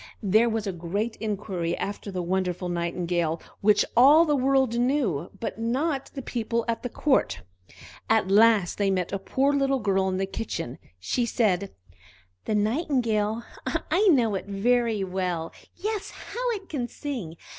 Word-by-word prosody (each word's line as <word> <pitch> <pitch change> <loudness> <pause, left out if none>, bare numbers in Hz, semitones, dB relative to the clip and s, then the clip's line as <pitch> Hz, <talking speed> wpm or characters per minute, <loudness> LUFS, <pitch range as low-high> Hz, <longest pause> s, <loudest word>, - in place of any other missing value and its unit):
There 215 +4 +4
was 220 -1 -2
a 195 - -1
great 195 +6 -3
inquiry 190 -5 -3
after 200 +1 -4
the 185 -2 -3
wonderful 180 0 -1
Nightingale, 170 -1 -1 0.2
which 210 0 +4
all 285 +7 +7
the 300 -2 +2
world 265 -3 +2
knew, 240 - 0
but 225 - -4
not 270 +5 -1
the 270 - -5
people 235 -1 -2
at 230 -1 -1
court. 100 - +1 0.7
At 220 -3 +3
last 210 -3 +4
they 200 -1 +2
met 185 -2 -1
with 195 - -3
a - - -24
poor 275 +6 +1
little 275 -1 +2
girl 195 -4 +1
in 185 - -1
the 195 - 0
kitchen. 170 - -5 0.2
She 235 - -1
said: 200 -5 +1 0.7
"The 215 - 0
Nightingale? 225 -2 0 0.5
I 410 +4 +4
know 245 - +4
it 195 - -3 0.6
well; 180 -3 -2 0.2
yes, 420 +2 -3
how - - -4
it 390 -3 -7
can 255 -6 -3
sing! 240 - -6
215 Hz, 155 wpm, -26 LUFS, 185-260 Hz, 0.7 s, all